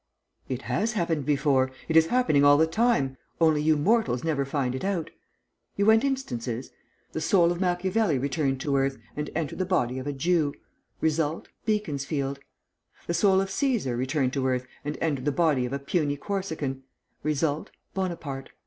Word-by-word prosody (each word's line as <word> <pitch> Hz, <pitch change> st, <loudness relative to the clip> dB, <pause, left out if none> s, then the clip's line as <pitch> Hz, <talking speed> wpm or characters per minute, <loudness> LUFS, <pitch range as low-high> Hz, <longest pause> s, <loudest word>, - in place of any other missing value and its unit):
"It 130 Hz, 0 st, -3 dB
has 215 Hz, +4 st, 0 dB
happened 165 Hz, -8 st, -1 dB
before. 140 Hz, -2 st, +3 dB, 0.2 s
It 160 Hz, -, -1 dB
is 160 Hz, 0 st, +7 dB
happening 240 Hz, -, +3 dB
all 145 Hz, 0 st, +7 dB
the 160 Hz, -, +5 dB
time, 165 Hz, -, +1 dB, 0.2 s
only 160 Hz, -3 st, +4 dB
you 155 Hz, 0 st, +3 dB
mortals 170 Hz, -, +2 dB
never 150 Hz, -4 st, 0 dB
find 135 Hz, -2 st, -1 dB
it 130 Hz, -, -4 dB
out. 180 Hz, -5 st, -1 dB, 0.6 s
You 200 Hz, -, +1 dB
want 220 Hz, +2 st, +6 dB
instances? 130 Hz, -, -3 dB, 0.4 s
The 160 Hz, -, -3 dB
soul 175 Hz, -2 st, +4 dB
of 175 Hz, -, -3 dB
Macchiavelli 185 Hz, -1 st, +1 dB
returned 135 Hz, 0 st, 0 dB
to 140 Hz, 0 st, 0 dB
earth 135 Hz, 0 st, +1 dB, 0.2 s
and 150 Hz, 0 st, -3 dB
entered 160 Hz, 0 st, -2 dB
the -, -, +2 dB
body 130 Hz, -9 st, 0 dB
of 130 Hz, -, -6 dB
a -, -, 0 dB
Jew; 150 Hz, 0 st, +1 dB, 0.5 s
result, 160 Hz, 0 st, 0 dB, 0.2 s
Beaconsfield. 140 Hz, -9 st, -1 dB, 0.7 s
The 170 Hz, -, -1 dB
soul 190 Hz, +1 st, +4 dB
of 195 Hz, -, -3 dB
Cæsar 220 Hz, -, 0 dB
returned 130 Hz, +1 st, 0 dB
to 135 Hz, -2 st, 0 dB
earth 130 Hz, -1 st, 0 dB, 0.2 s
and 150 Hz, +1 st, -4 dB
entered 140 Hz, -5 st, -1 dB
the 145 Hz, -, +2 dB
body 140 Hz, -4 st, +2 dB
of -, -, -8 dB
a -, -, 0 dB
puny 145 Hz, 0 st, -1 dB
Corsican; 160 Hz, -7 st, -3 dB, 0.4 s
result, 150 Hz, 0 st, -1 dB, 0.2 s
Bonaparte. 165 Hz, -8 st, -4 dB
150 Hz, 170 wpm, -27 LUFS, 135-180 Hz, 0.7 s, is